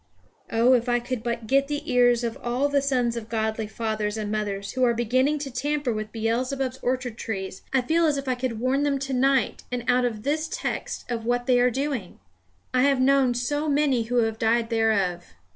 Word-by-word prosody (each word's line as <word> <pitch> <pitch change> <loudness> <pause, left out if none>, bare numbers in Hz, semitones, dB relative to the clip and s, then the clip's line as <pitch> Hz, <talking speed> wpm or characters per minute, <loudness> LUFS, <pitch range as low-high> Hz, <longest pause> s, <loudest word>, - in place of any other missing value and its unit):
Oh 235 +3 +4
if 245 0 +2
I 240 0 +3
could 240 -1 -4
but 235 -1 -3
get 275 +4 +2
the 295 +1 -3
ears 245 -1 +4
of 230 -1 -2
all 245 +4 0
the 285 -1 +2
sons 250 -4 0
of 230 -1 -6
godly 220 -1 -1
fathers 215 -1 -2
and 210 -1 -3
mothers 200 -2 -3
who 255 - -1
are 240 -1 +3
beginning 255 +6 +1
to 280 -2 -5
tamper 280 0 -1
with 215 0 -5
Beelzebub's 255 +4 -1
orchard 250 -2 -2
trees, 190 -3 -5
I 265 -1 +2
feel 325 +5 +2
as 295 -2 +1
if 275 0 -5
I 255 - +2
could 245 -3 -3
warn 260 +3 +1
them 290 -1 +1
to 270 0 -4
night, 265 +1 +2
and 245 -1 -2
out 250 0 +3
of 220 -3 -3
this 310 +3 0
text, - - -4
of 230 -2 -2
what 245 0 0
they 250 -1 +4
are 250 +1 +4
doing! 260 -6 -3 0.5
I 255 - +3
have 275 0 +3
known 260 -1 +3
so 290 +5 -1
many 280 -5 +2
who 240 +1 +2
have 225 0 -2
died 230 +1 +1
thereof. 200 -6 +1
245 Hz, 210 wpm, -25 LUFS, 225-270 Hz, 0.5 s, Oh